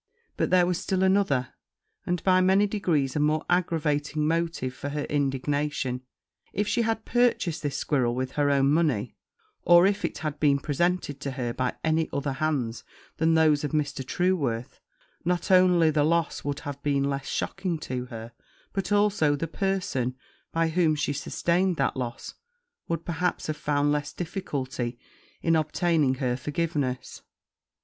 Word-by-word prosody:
But - - 0
there 180 -1 +5
was 180 -1 0
still 190 -1 0
another, 190 -10 +2 0.6
and, 175 -1 -1
by 185 -1 +4
many 190 +2 +4
degrees, 170 -10 0
a - - +1
more 150 +1 +1
aggravating 155 -4 0
motive 165 -6 -1
for 140 +2 -5
her 145 0 -3
indignation: 140 -2 -1 0.5
if 205 +1 0
she 235 - +1
had 225 -1 -1
purchased 240 -9 +1
this 140 -2 -2
squirrel 125 -5 +1
with 130 0 -2
her 145 0 +1
own 140 0 +3
money, 145 -9 +1 0.5
or 175 +1 +6
if 200 +1 +1
it - - -2
had 150 0 -4
been 145 -2 +4
presented 145 +1 -1
to 140 -1 -4
her 120 -3 -3
by 125 0 -1
any 160 0 +1
other 140 0 -2
hands 130 -6 -1 0.3
than 160 +1 +3
those 155 -2 +4
of 150 - -3
Mr. 145 -3 -1
Trueworth, 135 -7 -1 0.4
not 180 +2 0
only 180 -3 +5
the 150 -1 +2
loss 165 +1 +1
would 145 0 -3
have 140 -1 -6
been 140 -1 +1
less 140 -1 -2
shocking 180 -4 -2
to 125 -2 -4
her, 115 -1 -8 0.4
but 195 +1 -2
also 205 -8 +3
the 165 +3 -3
person, 180 -9 -1 0.4
by 165 0 +1
whom 160 -2 +2
she 145 -1 -1
sustained 175 +5 0
that 135 - +1
loss, 120 -2 -5 0.5
would, 165 -1 -3
perhaps, 175 +1 -1
have 155 - -2
found 145 -1 +1
less 145 0 -1
difficulty 135 - -4 0.5
in 165 0 +3
obtaining 155 -3 +2
her 125 -2 -1
forgiveness. 145 -2 -3
150 Hz, 160 wpm, -26 LUFS, 140-175 Hz, 0.6 s, or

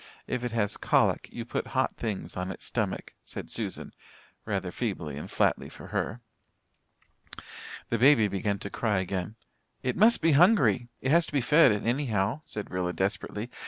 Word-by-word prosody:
If 125 -1 -3
it 120 - -2
has 110 -3 0
colic, - - +2
you 115 - -6
put 120 - -3
hot 130 - +1
things 100 -7 -4
on 90 0 -3
its 95 - -7
stomach," - - -3
said - - -8
Susan, - - -4 0.5
rather 95 -4 -2
feebly 90 - -3
and 75 - -7
flatly - - +1
for - - -11
her. 120 +3 -2 1.7
The 115 - 0
baby 125 -4 +6
began 100 +1 -1
to 100 +1 -7
cry 105 -4 0
again. 95 +2 -3 0.5
"It 125 - 0
must 220 +5 +5
be 165 0 +3
hungry 140 - +5
it 130 - 0
has 170 +1 +4
to - - -9
be 145 - +2
fed 150 +2 +6
anyhow," 115 +2 0
said 105 - -6
Rilla 90 -1 -1
desperately. 105 +4 -3
110 Hz, 165 wpm, -28 LUFS, 95-130 Hz, 1.7 s, baby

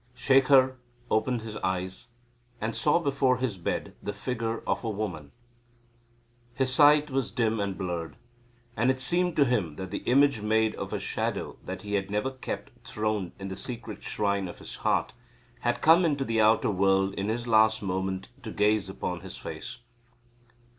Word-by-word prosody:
Shekhar 135 -1 +4 0.3
opened 110 +1 +1
his 110 -1 -6
eyes 95 +4 -3 0.5
and 110 +1 -2
saw 150 - +3
before 140 -5 +2
his 125 -4 -1
bed 85 - -3
the - - -3
figure 115 -2 -3
of - - -1
a 115 - -1
woman. 95 -9 -4 1.2
His 130 -1 +1
sight 150 +1 +5
was 135 -3 0
dim 115 -2 0
and 100 -2 -2
blurred. 85 -3 -4 0.6
And 120 +4 +2
it 130 0 +1
seemed 175 +6 +1
to 145 - +5
him 105 - 0
that 95 +1 -6
the - - -2
image 140 -2 +4
made 110 +1 +2
of - - -6
a - - -2
shadow - - -3
that 95 0 -6
he 105 0 -5
had 100 -1 -1
ever 105 +6 0
kept 130 +1 -6
throned 110 -6 -2
in 95 0 -6
the 95 - -5
secret 115 -2 -7
shrine 100 -2 -1
of 85 - -9
his - - -9
heart - - 0 0.5
had 120 0 -1
come 165 +3 +7
into 145 -5 +1
the 115 -2 +1
outer 110 0 +4
world 95 0 +2
in 100 +1 -2
his 120 +2 -2
last 110 -1 +4
moment 95 0 -2
to 110 - -7
gaze 105 -2 +1
upon 90 -2 -4
his 95 +1 -9
face. - - -7
110 Hz, 175 wpm, -28 LUFS, 95-130 Hz, 1.2 s, come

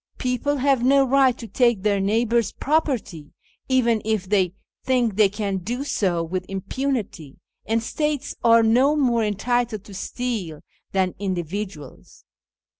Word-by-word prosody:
People 255 +3 -1
have 270 -2 +2
no 275 +1 +5
right 265 -1 +3
to 230 - -8
take 235 -1 +1
their 205 -2 +2
neighbours' 225 +2 +1
property, 255 - -2 0.4
even 235 -4 +2
if 215 -4 -1
they 190 -2 +1 0.3
think 245 -5 +1
they 210 -1 +4
can 200 -1 -3
do 235 +9 -4
so 180 -11 0
with 180 +2 -3
impunity, 195 - -4 0.3
and 225 +1 0
states 295 +2 -2
are 230 -1 +6
no 255 +7 +4
more 245 -6 +2
entitled 220 +1 -1
to 205 - -13
steal 195 -7 -4 0.3
than 190 -2 0
individuals." 185 -4 -6
225 Hz, 135 wpm, -23 LUFS, 195-250 Hz, 0.4 s, are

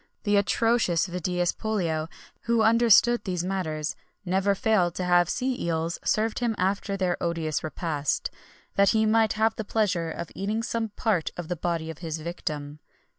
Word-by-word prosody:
The 205 -1 +2
atrocious 205 -3 +2
Vedius 180 -1 -1
Pollio, 165 -8 -2 0.4
who 235 -1 +3
understood 235 +1 +5
these 180 -3 -2
matters, 160 -5 -2 0.3
never 190 +2 +1
failed 195 -6 +2
to 185 - -2
have 175 -1 +3
sea 255 0 -1
eels 165 0 -1
served 220 +1 +1
him 235 -3 0
after 195 +2 -1
their 180 -2 -1
odious 165 -3 -1
repast, 155 -2 -2 0.4
that 200 -1 +4
he 220 - +3
might 220 0 +3
have 220 +1 +1
the 220 - -2
pleasure 195 -6 0
of 160 +1 -6
eating 210 +4 -2
some 230 -1 -2
part 205 -5 0
of 175 -2 -6
the 180 - -1
body 165 -1 -2
of 160 - -12
his 165 -2 -4
victim. 150 -3 -5
185 Hz, 165 wpm, -26 LUFS, 165-220 Hz, 0.4 s, understood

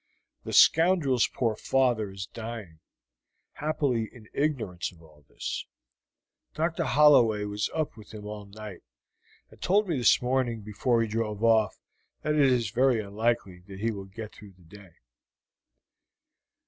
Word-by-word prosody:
The - - -5
scoundrel's 160 -7 +5
poor 115 -4 -1
father 120 -3 +1
is 95 0 -6
dying, 110 -7 -8 0.7
happily 145 -7 -1
in 110 -3 -16
ignorance 120 - -2
of 85 - -20
all 75 -2 -20
this. - - -5 0.9
Dr. 165 +1 -1
Holloway 120 -8 +5
was 105 0 -2
up 155 -1 -2
with 110 -2 -14
him 105 -1 -9
all 105 -1 -7
night, 105 -2 -10 0.7
and - - -19
told 205 +3 +2
me 160 -7 -1
this 120 - +5
morning 125 -3 -1
before 115 +3 0
he - - -2
drove 110 -1 -3
off 110 -2 +3 0.5
that 150 0 0
it 140 -3 +4
is 120 -5 0
very 125 0 +3
unlikely 105 -2 -1
that 95 -1 -10
he 115 +2 0
will 100 -3 -7
get 110 +3 -9
through 105 -2 -14
the 90 - -21
day." 90 0 -16
115 Hz, 150 wpm, -27 LUFS, 105-130 Hz, 0.9 s, scoundrel's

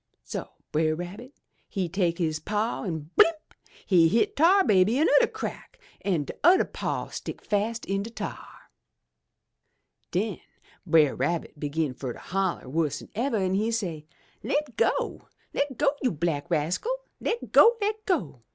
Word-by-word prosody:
So - - -5 0.2
Brer 155 0 +2
Rabbit 185 - -7 0.4
he 190 -3 -1
take 170 -1 0
his 160 -3 -1
paw 210 +8 -2
an' 160 -4 -5
blimp! 330 - +6 0.5
he 170 -4 +5
hit 225 +8 +2
Tar 365 +6 +5
Baby 200 - +4
anudder 405 - +4
crack - - -7 0.2
an' 175 -7 0
t'udder 355 - +4
paw - - -3
stick - - -6
fast 215 +3 -1
in 195 +1 -1
de 215 - -6
tar! 230 - -6 1.6
"Den - - -1 0.5
Brer 155 -4 +4
Rabbit 170 -3 -2
begin 150 -1 -1
fur 125 -1 -5
to - - -12
holler 190 -4 -2
wuss'n 155 +1 -2
ever, 230 +2 0
an' 190 -2 0
he 210 +4 +1
say, 175 -10 -3 0.3
*Le' - - -1 0.2
go! - - 0 0.3
Le' 285 - +1
go, 285 -2 +3
you 255 - +2
black 160 -1 -2
rascal! 175 - 0 0.2
Le' 455 - 0 0.2
go! 470 +1 +7
Le' 420 +1 +1
go! 175 - -1
190 Hz, 150 wpm, -27 LUFS, 160-235 Hz, 1.6 s, go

